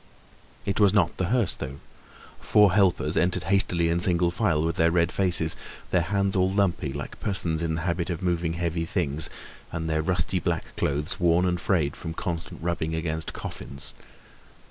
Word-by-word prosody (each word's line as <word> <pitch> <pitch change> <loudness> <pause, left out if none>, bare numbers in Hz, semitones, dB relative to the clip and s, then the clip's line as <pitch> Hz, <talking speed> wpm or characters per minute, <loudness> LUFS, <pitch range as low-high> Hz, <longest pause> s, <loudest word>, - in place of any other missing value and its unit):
It 100 +1 -1
was 100 -1 +5
not 90 -6 +2
the 95 - 0
hearse 120 +1 +2
though. 70 +2 -6 0.6
Four 105 -3 +4
helpers 95 -3 +2
entered 90 +1 +1
hastily 90 -2 +2
in 85 +1 +1
single 85 -1 +3
file, 85 -6 +1
with 80 0 0
their 85 0 +4
red 85 0 +2
faces, 85 -4 0 0.4
their 90 - +3
hands 100 +3 0
all 95 0 +3
lumpy 95 -8 +1
like 70 +1 -6
persons 85 -5 -1
in 80 -1 0
the 85 - -3
habit 85 +1 -1
of 85 0 -3
moving 85 -2 0
heavy 85 -1 -1
things, 80 -4 -1 0.4
and 80 0 -3
their 80 -1 +1
rusty 90 +2 0
black - - -2
clothes 75 +5 -1
worn 85 0 +3
and 90 -1 0
frayed 80 -6 +1
from 80 0 -6
constant 85 -2 -5
rubbing 80 -2 -1
against 80 -1 -3
coffins. 70 - -7
85 Hz, 175 wpm, -26 LUFS, 80-95 Hz, 0.6 s, was